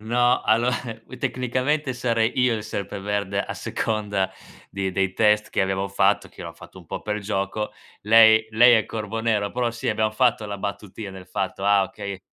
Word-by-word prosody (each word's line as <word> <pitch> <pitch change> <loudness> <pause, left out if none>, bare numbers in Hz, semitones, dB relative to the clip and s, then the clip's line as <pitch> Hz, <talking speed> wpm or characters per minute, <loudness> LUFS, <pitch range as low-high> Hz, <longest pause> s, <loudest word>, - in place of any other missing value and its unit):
No, 120 +3 +2
allo 115 +3 +2
eh 120 0 -5
tecnicamente 130 +3 -1
sarei 115 -2 0
io 125 -2 +3
il 110 - -4
Serpeverde, 100 -1 -3
a - - -6
seconda 105 -4 -2 0.4
di 95 -1 -3
dei 95 0 0
test 105 0 +2
che - - 0
abbiamo 95 +1 0
fatto, 100 +1 +2
che - - -15
l'ho - - -7
fatto - - -14
un - - -15
po' - - -6
per 105 0 -2
gioco. 100 +1 -3 0.3
Lei 110 +1 +6
lei 120 +2 +7
è 110 - +2
Corvonero, 110 -1 -2
però 120 0 -1
sì, 115 - -4
abbiamo 110 0 +1
fatto 120 -2 +2
la 100 0 -5
battutina 100 0 -6
del 95 -1 -11
fatto: 95 +1 -3
"Ah 100 -1 +4
okay" 100 0 -6
105 Hz, 180 wpm, -23 LUFS, 100-115 Hz, 0.4 s, lei